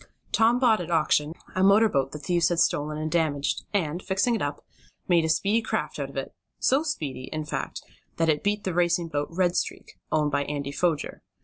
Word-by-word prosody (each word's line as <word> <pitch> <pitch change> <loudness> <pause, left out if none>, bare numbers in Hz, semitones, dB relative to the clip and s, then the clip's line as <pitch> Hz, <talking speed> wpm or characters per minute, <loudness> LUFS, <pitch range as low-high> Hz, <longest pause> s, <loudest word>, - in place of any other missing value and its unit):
Tom 230 +2 +4
bought 235 -6 +3
at 175 - -6
auction, 155 -2 +2 0.2
a 185 - 0
motor 200 +4 +6
boat 135 -8 0
the - - -6
thieves 170 +3 +1
had 175 - 0
stolen 150 -1 +1
and 155 0 -3
damaged, 155 -4 0
and, 175 -4 -1
fixing 195 +6 +1
it 225 - -1
up, 145 0 -3 0.4
made 175 -2 +4
a 160 - -1
speedy 200 +8 +2
craft - - -3
of - - -5
it - - -4 0.2
so 270 +3 +3
speedy, 150 - -4
in 155 -1 -3
fact - - -4 0.3
that 165 - +2
it 150 -2 +2
beat 205 0 0
the 185 - -2
racing 175 -1 +1
boat 145 -1 -1
Red 175 +1 +1
Streak - - -4
owned 150 -1 +2
by 140 0 +1
Andy 140 -1 -3
Foger. 160 0 -1
165 Hz, 205 wpm, -26 LUFS, 150-195 Hz, 0.4 s, motor